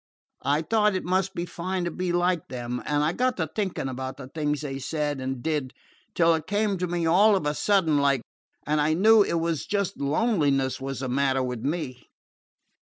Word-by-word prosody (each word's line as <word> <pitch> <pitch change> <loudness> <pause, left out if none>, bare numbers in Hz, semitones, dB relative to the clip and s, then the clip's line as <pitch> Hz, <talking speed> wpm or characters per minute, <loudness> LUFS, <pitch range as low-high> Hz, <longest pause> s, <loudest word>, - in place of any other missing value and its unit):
I 145 +3 +2
thought 210 +2 +2
it 185 - -2
must 190 +2 0
be 170 0 -2
fine 180 +1 -3
to 175 - -2
be 180 +1 -2
like 175 -1 +1
them, 125 -1 -4
and 145 0 +1
I 155 +3 +1
got 255 +3 0
to 165 - 0
thinking 190 -3 -3
about 130 0 -5
the 130 - -9
things 150 0 -2
they 135 -2 -4
said 145 0 -2
and 130 -1 -4
did, 150 -5 -1 0.4
till 170 -1 +4
it 160 -1 -3
came 205 -1 0
to 180 - -1
me 175 -1 -1
all 200 +6 +5
of 185 - -1
a 150 - +1
sudden 165 -4 +2
like, 140 -3 +2 0.4
and 150 0 +1
I 155 +1 +2
knew 215 +4 +6
it 200 - +1
was 165 -3 -2
just 200 -2 -1
loneliness 140 - +1
was 135 -1 -4
the 130 - -2
matter 135 0 +1
with 125 -2 -3
me. 140 -4 -3
155 Hz, 205 wpm, -26 LUFS, 135-185 Hz, 0.4 s, knew